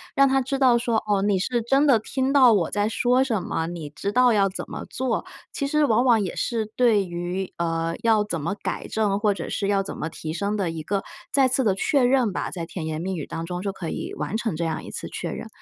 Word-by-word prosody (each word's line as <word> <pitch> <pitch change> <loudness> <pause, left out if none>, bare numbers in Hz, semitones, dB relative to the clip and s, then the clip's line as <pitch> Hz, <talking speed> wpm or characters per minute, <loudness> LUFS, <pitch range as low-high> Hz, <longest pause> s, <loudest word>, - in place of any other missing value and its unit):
让 275 0 +6
她 270 0 +2
知 270 +1 -2
道 255 -3 +5
说： 235 -2 0
“哦， 205 -2 +2
你 200 -1 +2
是 240 +5 0
真 270 +6 +3
的 265 -5 +6
听 265 +5 -1
到 260 -4 +7
我 190 -7 +2
在 205 +1 0
说 250 +3 +2
什 230 -7 -1
么， 165 -2 -2
你 165 -3 -6
知 200 +7 -4
道 250 +2 +4
要 200 -2 +3
怎 185 - -6
么 - - -6
做。” 255 -2 -2 0.3
其 280 - -2
实 300 +2 +2
往 230 -2 +3
往 235 -4 +4
也 190 - -3
是 230 -2 -1
对 225 -5 +3
于 175 +2 -4
呃， 165 0 -1
要 220 -2 +3
怎 170 -6 -3
么 170 +6 -1
改 - - -3
正， 210 -3 +1
或 205 0 +2
者 175 -4 -6
是 200 - -2
要 200 -1 +2
怎 195 - -6
么 155 - -3
提 160 -1 -6
升 200 +4 -1
的 190 -4 0
一 165 -1 -5
个 195 +4 -1 0.3
再 270 -2 +4
次 260 +1 +1
的 205 -5 +3
确 270 +8 +1
认 245 -4 +3
吧， - - -3
在 170 -3 -4
甜 165 -1 -6
言 155 -1 -3
蜜 190 +2 -2
语 155 - -4
当 165 - -5
中 180 +1 -4
就 200 +1 -2
可 190 -3 -7
以 - - -4
完 150 +7 -3
成 220 -7 -2
这 170 - -1
样 160 - -3
一 - - -9
次 - - -5
确 - - -5
认。 - - -6
205 Hz, 280 characters per minute, -24 LUFS, 175-245 Hz, 0.3 s, 到